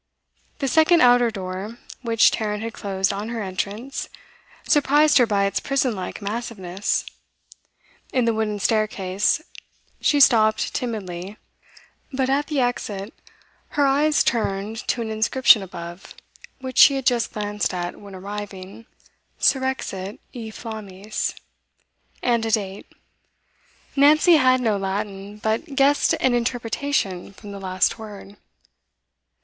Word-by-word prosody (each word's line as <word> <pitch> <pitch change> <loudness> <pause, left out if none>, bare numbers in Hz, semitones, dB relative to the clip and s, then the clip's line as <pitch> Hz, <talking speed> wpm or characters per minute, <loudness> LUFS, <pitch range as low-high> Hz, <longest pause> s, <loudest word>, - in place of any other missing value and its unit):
The 275 - -2
second 320 +4 +4
outer 245 -1 +5
door, 195 +2 -6 0.2
which 230 -2 +4
Tarrant 210 -1 -2
had 230 0 -5
closed 195 -1 -1
on 205 +3 -4
her 230 -2 -3
entrance, 205 +7 -4 0.6
surprised 295 0 +4
her 245 - +4
by 200 -2 +2
its 195 - 0
prison 270 -4 0
like 185 +2 -6
massiveness. 200 -3 -2 1.1
In 255 -2 +1
the 230 - +2
wooden 215 -1 -1
staircase 205 +3 0 0.6
she 290 - +3
stopped 220 -5 +4
timidly, 200 -4 -4 0.7
but 265 -1 0
at 285 +2 +1
the 300 -3 -1
exit 215 -4 -3 0.6
her 290 - +4
eyes 295 +3 +3
turned 210 -1 -1
to 235 - 0
an 220 - -5
inscription 220 +1 +4
above, 175 -1 -9 0.5
which 260 -1 -3
she 280 - +8
had 270 -2 -3
just 240 -2 +2
glanced 210 0 -2
at 175 -1 -4
when 200 -2 -11
arriving: 200 +1 -8 0.5
Surrexit 260 -7 0 0.2
e 230 -3 -6
flammis, 215 -2 -5 0.9
and 235 -2 +2
a 225 - -1
date. 200 -3 -2 1.1
Nancy 305 +4 +6
had 255 -2 +4
no 220 -4 +1
Latin, 195 +1 -4
but 220 +8 -2
guessed 280 +1 +3
an 260 - +2
interpretation 235 -5 -1
from 205 +1 -11
the 200 - -7
last 185 +3 0
word. 205 -2 -10
220 Hz, 125 wpm, -23 LUFS, 200-255 Hz, 1.1 s, she